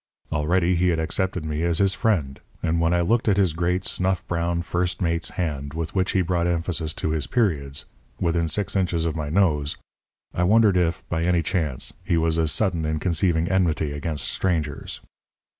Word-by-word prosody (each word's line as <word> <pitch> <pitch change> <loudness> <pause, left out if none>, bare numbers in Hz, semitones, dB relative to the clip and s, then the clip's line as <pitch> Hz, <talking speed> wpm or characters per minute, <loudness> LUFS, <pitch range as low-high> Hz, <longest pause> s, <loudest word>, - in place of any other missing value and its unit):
Already 85 +4 +2
he 90 +1 +2
had 85 -2 +2
accepted 90 +1 -1
me 75 0 -2
as 85 -1 +1
his 100 0 +3
friend; 80 -13 0 0.2
and 85 0 +1
when 85 0 +2
I 85 0 +2
looked 110 +5 +2
at 100 - +3
his 95 -5 +3
great, 90 +2 0
snuff 95 0 0
brown 85 0 -1
first 90 +1 -1
mate's 85 -2 0
hand, 75 -4 -3
with 80 -1 -3
which 95 -1 0
he 95 - +3
brought 85 0 0
emphasis 85 -2 -1
to 80 - -2
his 80 -2 -1
periods, 75 - 0 0.3
within 85 -1 +1
six 100 +6 -2
inches 90 -4 +1
of 80 - -1
my 75 -3 -3
nose, 75 -5 +1 0.6
I - - -1
wondered 105 +2 +5
if, 85 -2 0
by 80 -1 -1
any 85 -1 +2
chance, 80 -7 -2
he 85 - +1
was 80 0 +1
as 80 -2 +1
sudden 90 -5 0
in 80 0 -1
conceiving 85 0 +1
enmity 85 -5 +1
against 75 0 -3
strangers. 80 -6 -2
85 Hz, 190 wpm, -24 LUFS, 80-90 Hz, 0.6 s, wondered